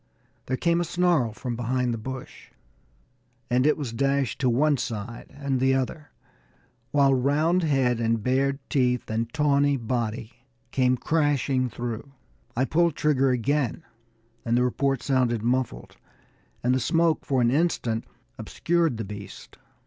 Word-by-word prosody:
There 130 - -1
came 170 +2 +2
a - - +1
snarl 175 -8 +1
from 120 +2 -5
behind 125 +1 -1
the - - -3
bush, 130 +3 -8 1.0
and 125 +3 +3
it 150 - +3
was 135 -7 -4
dashed 135 0 0
to 130 - +3
one 145 +4 +3
side 115 0 -5
and 140 -2 -2
the 130 +1 +3
other, 145 +3 -3 0.8
while 140 -2 +4
round 150 +7 +2
head 135 -7 +1
and 115 -2 0
bared 135 +2 +1
teeth 125 -4 0
and 115 +1 -2
tawny 145 -1 +2
body 115 -1 -3 0.4
came 130 -1 +2
crashing 140 -3 +1
through. 120 +4 -6 0.4
I 130 - +3
pulled 170 +1 +2
trigger 135 -3 +2
again, 135 +4 0 0.6
and 115 0 +1
the 125 - +3
report 135 +1 0
sounded 125 -5 +1
muffled, 120 - -2 0.7
and 125 +1 +3
the 130 - +2
smoke 165 +5 +1
for 135 -2 0
an 120 -1 +3
instant 130 -7 0 0.3
obscured 170 -7 0
the 110 - -4
beast. 100 0 -10
130 Hz, 145 wpm, -25 LUFS, 120-145 Hz, 1.0 s, while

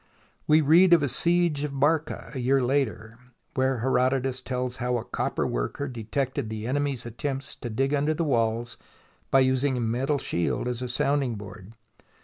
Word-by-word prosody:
We 155 +1 +5
read 170 +5 +6
of 165 -4 +5
a - - +2
siege 170 0 +1
of 140 -2 -4
Barca, 155 +2 0
a 135 - -4
year 135 +2 +2
later, 120 -4 -1 0.3
where 130 -2 0
Herodotus 130 0 +1
tells 125 -1 -3
how 125 0 0
a 115 - -5
copper - - -2
worker - - -2
detected 130 +1 -3
the 110 0 -5
enemy's 135 -1 -1
attempts 135 +4 -4
to 120 - -6
dig 135 +6 0
under 145 +2 +1
the 165 - -1
walls 115 -4 0 0.5
by 135 - +5
using 130 +1 +2
a - - -1
metal 125 +5 0
shield 85 -1 -1
as 125 0 -3
a 125 - -3
sounding 135 -1 0
board. 105 0 -10
130 Hz, 170 wpm, -26 LUFS, 120-145 Hz, 0.5 s, read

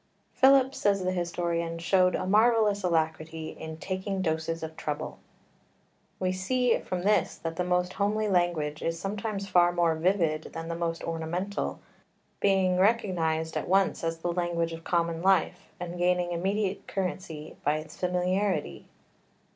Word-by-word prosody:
"Philip," 265 0 +5
says 200 -5 +1
the 185 - 0
historian, 170 -1 -2
"showed 180 +2 +3
a - - -2
marvellous 215 0 +4
alacrity 160 -2 -1
in 160 0 -8
taking 190 +2 -3
doses 160 0 -1
of 160 0 -6
trouble." 155 -2 -4 1.0
We 185 -1 +1
see 245 +7 +1
from 180 -1 -4
this 210 +2 +2
that 165 0 -5
the 180 - 0
most 180 0 0
homely 210 +2 0
language 175 -5 0
is 165 0 -2
sometimes 200 +1 -3
far 175 -2 +4
more 170 -2 +2
vivid 160 -2 0
than 165 0 -5
the 170 - -2
most 165 0 -2
ornamental, 170 +5 -3 0.6
being 190 -2 +3
recognised 170 -7 +1
at - - -2
once 190 -1 +2
as 165 0 -1
the 170 +1 -2
language 170 -1 -1
of 165 0 -8
common 170 -1 0
life, 185 -1 +2
and 175 0 -5
gaining 180 0 +2
immediate 195 +3 -1
currency 180 -5 -4
by 150 +1 +2
its 155 0 -8
familiarity. 180 -1 -1
180 Hz, 145 wpm, -28 LUFS, 165-195 Hz, 1.0 s, Philip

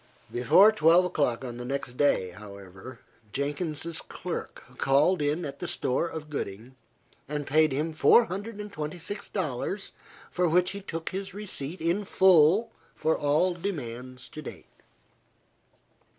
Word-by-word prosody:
Before 155 - +6
twelve 175 -3 +5
o'clock 140 -8 0
on 120 -1 -6
the 120 - -6
next 130 -1 -4
day, 125 -10 +2
however, 100 +4 -11 0.3
Jenkins's 150 - -2
clerk - - -6 0.2
called 150 +6 +3
in 150 +4 0
at 140 -1 -7
the 175 - -4
store 170 -2 0
of 160 -2 -7
Gooding, 125 -3 -6 0.5
and 150 -1 -3
paid 155 +2 +3
him 155 +4 -1
four 230 +9 +6
hundred 205 +2 -6
and 210 -1 -7
twenty 155 +2 -4
six 200 +4 -6
dollars, 185 +3 -3 0.4
for 180 -1 +1
which 180 +2 +3
he 200 +1 -6
took 165 -4 -5
his 195 0 -5
receipt 185 -6 -4
in 170 +5 +1
full 190 +3 +5 0.2
for 160 0 +1
all 150 +5 +2
demands 130 -9 -5
to 155 - -8
date. - - -9
155 Hz, 145 wpm, -28 LUFS, 135-185 Hz, 0.5 s, Before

